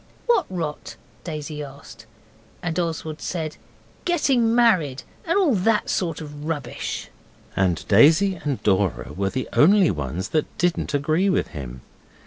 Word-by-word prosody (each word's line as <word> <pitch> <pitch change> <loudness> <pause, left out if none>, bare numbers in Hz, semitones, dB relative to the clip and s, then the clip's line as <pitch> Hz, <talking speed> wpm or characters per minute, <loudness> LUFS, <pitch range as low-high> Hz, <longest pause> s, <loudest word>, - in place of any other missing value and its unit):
'What 475 -1 +3
rot?' 165 -5 -5 0.3
Daisy 155 -2 -5
asked. 140 0 -11 0.6
And 170 0 -1
Oswald 160 -2 -3
said 160 -4 -4 0.5
'Getting 260 -10 +2
married, 175 - +3 0.2
and 335 +3 +1
all 360 -9 +3
that 210 +2 +1
sort 165 -4 -1
of 150 -1 -8
rubbish.' 150 -6 -4 0.5
And 90 -4 0
Daisy 160 - +6
and 145 -4 -2
Dora 95 -8 +1
were 95 +3 -1
the 130 +5 -3
only 190 +3 +5
ones 80 - -4
that 155 +2 -1
didn't 175 -4 0
agree 155 +7 +2
with 185 - +1
him. 65 -4 -8
155 Hz, 135 wpm, -23 LUFS, 130-185 Hz, 0.6 s, Daisy